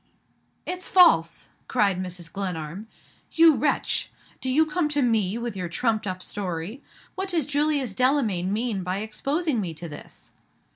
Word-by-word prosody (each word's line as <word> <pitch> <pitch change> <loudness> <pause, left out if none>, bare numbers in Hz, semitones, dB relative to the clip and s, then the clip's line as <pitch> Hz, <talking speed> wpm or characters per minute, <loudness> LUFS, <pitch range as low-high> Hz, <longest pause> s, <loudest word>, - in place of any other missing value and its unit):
"It's 365 0 -3
false!" 330 - +4 0.2
cried 200 -6 +2
Mrs. 180 -2 -5
Glenarm. 185 0 -4 0.5
"You 330 -1 +7
wretch! 285 +1 0 0.3
Do 260 - -1
you 305 +5 +4
come 315 0 0
to 290 -2 +1
me 220 -4 +2
with 235 -2 -4
your 180 -2 -4
trumped 220 +4 0
up 185 -1 -4
story? 185 - -4 0.3
What 380 +1 -4
does 335 -6 0
Julius 290 -5 0
Delamayn 225 -8 +1
mean 215 -2 -1
by 180 +1 -2
exposing 275 +5 -1
me 170 -4 -4
to 170 +2 -7
this?" 145 - -11
220 Hz, 150 wpm, -25 LUFS, 185-290 Hz, 0.5 s, You